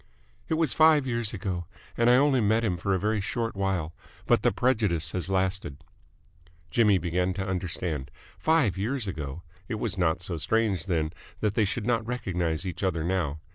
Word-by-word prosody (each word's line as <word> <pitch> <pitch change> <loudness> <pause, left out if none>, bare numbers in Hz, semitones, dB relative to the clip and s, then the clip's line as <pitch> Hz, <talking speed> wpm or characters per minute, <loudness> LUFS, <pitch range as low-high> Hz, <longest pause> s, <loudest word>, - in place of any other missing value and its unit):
"It 160 - +2
was 160 -1 +1
five 155 -3 +5
years 115 -4 0
ago, 90 -5 -4 0.3
and 115 0 +3
I 125 - +7
only 135 -1 +4
met 110 +2 +2
him 100 -6 +1
for 95 +3 0
a - - 0
very 105 +1 0
short 115 +2 -2
while, 95 -5 -1 0.3
but - - +3
the - - +3
prejudice 105 -11 +1
has 90 0 -2
lasted." 95 -6 0 0.9
Jimmy 105 -4 +4
began 90 +1 -1
to 95 -1 -2
understand. 90 -6 -3 0.3
Five 155 - +2
years 115 +2 -1
ago! 75 -2 -5 0.2
It - - -3
was 105 -3 -3
not 85 -1 +1
so 85 - -1
strange, 100 0 0
then, 80 -4 0 0.3
that 105 -2 +1
they 110 0 +2
should 105 +2 -2
not 115 -2 +1
recognise 90 -8 -2
each 90 -4 -5
other 90 -5 0
now. 85 -4 -1
95 Hz, 180 wpm, -27 LUFS, 85-115 Hz, 0.9 s, I